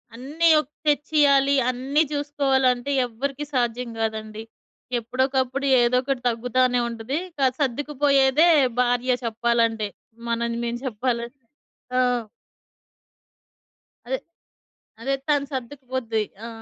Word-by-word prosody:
అన్ని 295 Hz, +8 st, 0 dB
ఒక్ 295 Hz, -, -17 dB, 0.2 s
తెచ్చియాలి, 285 Hz, -2 st, +3 dB, 0.2 s
అన్నీ 265 Hz, +4 st, 0 dB
చూసుకోవాలంటే 275 Hz, -3 st, +1 dB
ఎవ్వరికీ 275 Hz, +5 st, -4 dB
సాధ్యం 240 Hz, -1 st, -1 dB
కాదండి. 220 Hz, 0 st, -3 dB, 0.6 s
ఎప్పుడోకప్పుడు 260 Hz, +3 st, -1 dB, 0.2 s
ఏదో 240 Hz, +1 st, +3 dB
ఒకటి 270 Hz, -2 st, -2 dB
తగ్గుతానే 245 Hz, +2 st, +1 dB
ఉంటది. 235 Hz, +5 st, -4 dB, 0.2 s
స -, -, -15 dB, 0.2 s
సర్దుకుపోయేదే 285 Hz, +2 st, +3 dB, 0.3 s
భార్య 245 Hz, +1 st, +1 dB
చెప్పాలంటే. 230 Hz, -1 st, +1 dB, 0.4 s
మనం 235 Hz, 0 st, -1 dB
మేము 235 Hz, 0 st, -3 dB
చెప్పాలంటే. 240 Hz, +2 st, -3 dB, 0.6 s
ఆ! -, -, +4 dB, 2.1 s
అదే. -, -, 0 dB, 0.8 s
అదే. 275 Hz, +3 st, -1 dB
తను 290 Hz, -2 st, +2 dB
సర్దుకుపోద్ది. 255 Hz, -3 st, -3 dB, 0.2 s
ఆ! -, -, -5 dB
255 Hz, 95 wpm, -24 LUFS, 235-280 Hz, 2.1 s, ఆ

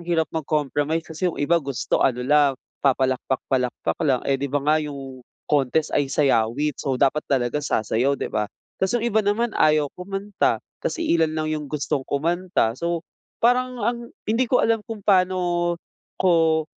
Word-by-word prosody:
hirap 165 Hz, -2 st, +2 dB
mag-compromise 155 Hz, 0 st, -1 dB
kasi 160 Hz, +3 st, -2 dB
yung -, -, -11 dB
iba 170 Hz, +4 st, +2 dB
gusto 140 Hz, -3 st, -1 dB
ano 125 Hz, -1 st, +1 dB
lang 145 Hz, 0 st, +4 dB, 0.3 s
papalakpak-palakpak 130 Hz, -1 st, 0 dB
lang 135 Hz, -5 st, +2 dB
eh, 140 Hz, -, +2 dB
di 140 Hz, -, -1 dB
ba 145 Hz, -, +1 dB
nga 155 Hz, +1 st, +4 dB
yung 135 Hz, -3 st, -7 dB, 0.3 s
contest 150 Hz, +1 st, +1 dB
ay 145 Hz, -, +1 dB
sayawit 140 Hz, +1 st, +2 dB
so 135 Hz, -3 st, -1 dB
dapat 140 Hz, +3 st, +2 dB
talaga 130 Hz, +1 st, +1 dB
sasayaw 130 Hz, +1 st, 0 dB
di -, -, -2 dB
ba. 105 Hz, -1 st, 0 dB, 0.3 s
Tapos 190 Hz, +5 st, +2 dB
yung 230 Hz, -, -3 dB
iba 220 Hz, -2 st, +3 dB
naman 220 Hz, +3 st, 0 dB
ayaw 150 Hz, -1 st, +4 dB
kumanta, 195 Hz, +2 st, -1 dB, 0.3 s
tapos -, -, -1 dB
iilan 165 Hz, -, +2 dB
lang 155 Hz, 0 st, -1 dB
yung 155 Hz, -1 st, -3 dB
gustong 145 Hz, -2 st, -1 dB
kumanta. 170 Hz, -3 st, 0 dB
So 170 Hz, 0 st, -2 dB, 0.4 s
parang 250 Hz, +1 st, +3 dB
ang 235 Hz, +1 st, 0 dB, 0.3 s
hindi 230 Hz, +3 st, +1 dB
ko 250 Hz, -, +4 dB
alam 225 Hz, -1 st, +2 dB
kung 225 Hz, -2 st, -5 dB
pa'no 180 Hz, -3 st, +2 dB, 0.4 s
ko, 165 Hz, -3 st, +3 dB
155 Hz, 160 wpm, -23 LUFS, 140-180 Hz, 0.4 s, lang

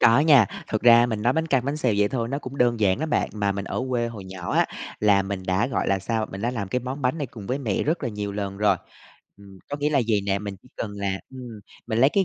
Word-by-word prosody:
Có 115 Hz, +2 st, +6 dB
nha, 140 Hz, -9 st, +6 dB, 0.2 s
thực 110 Hz, -, -1 dB
ra 120 Hz, 0 st, +7 dB
mình 110 Hz, -3 st, -3 dB
nói 120 Hz, +2 st, +3 dB
bánh 160 Hz, +2 st, 0 dB
căn, 135 Hz, -5 st, +2 dB
bánh 140 Hz, +2 st, -1 dB
xèo 125 Hz, -8 st, +1 dB
vậy 105 Hz, 0 st, +3 dB
thôi 115 Hz, -2 st, -2 dB
nó 140 Hz, +2 st, -2 dB
cũng 135 Hz, -1 st, -8 dB
đơn 120 Hz, -2 st, +2 dB
giản 95 Hz, +2 st, +3 dB
đó 160 Hz, -, -1 dB
bạn. -, -, +1 dB
Mà 105 Hz, -2 st, 0 dB
mình 100 Hz, 0 st, -4 dB
ở -, -, -3 dB
quê 120 Hz, -1 st, +1 dB
hồi 105 Hz, -5 st, -8 dB
nhỏ 95 Hz, -2 st, -6 dB
á, -, -, +3 dB, 0.3 s
là 100 Hz, -2 st, +4 dB
mình 95 Hz, -1 st, -4 dB
đã, 95 Hz, +5 st, +2 dB
gọi 130 Hz, -, -1 dB
là 95 Hz, -, +2 dB
sao, 110 Hz, +3 st, -1 dB
mình 95 Hz, +2 st, -6 dB
đã 120 Hz, -, +1 dB
làm 110 Hz, -6 st, -4 dB
cái 125 Hz, +6 st, -1 dB
món 130 Hz, +3 st, -5 dB
bánh 130 Hz, +6 st, +1 dB
này 145 Hz, -, -2 dB
cùng 110 Hz, -4 st, -10 dB
với 130 Hz, +3 st, -1 dB
mẹ 115 Hz, -8 st, -1 dB
rất 160 Hz, +3 st, 0 dB
là 125 Hz, -, 0 dB
nhiều 105 Hz, -2 st, -4 dB
lần 100 Hz, -1 st, -4 dB
rồi. 105 Hz, +1 st, +3 dB, 0.6 s
Ừm, 100 Hz, -1 st, -15 dB
có 145 Hz, -, -2 dB
nghĩa 150 Hz, +1 st, +1 dB
là 140 Hz, -, +3 dB
vầy 105 Hz, -2 st, +3 dB
nè, 100 Hz, 0 st, +1 dB
mình 100 Hz, -1 st, -6 dB
chỉ -, -, -19 dB
cần 105 Hz, -, -3 dB
là 100 Hz, -1 st, -2 dB
ừm, 125 Hz, -5 st, -9 dB, 0.3 s
mình 110 Hz, -1 st, -1 dB
lấy 135 Hz, +4 st, +6 dB
cái 195 Hz, -1 st, +2 dB
115 Hz, 295 wpm, -24 LUFS, 100-130 Hz, 0.6 s, ra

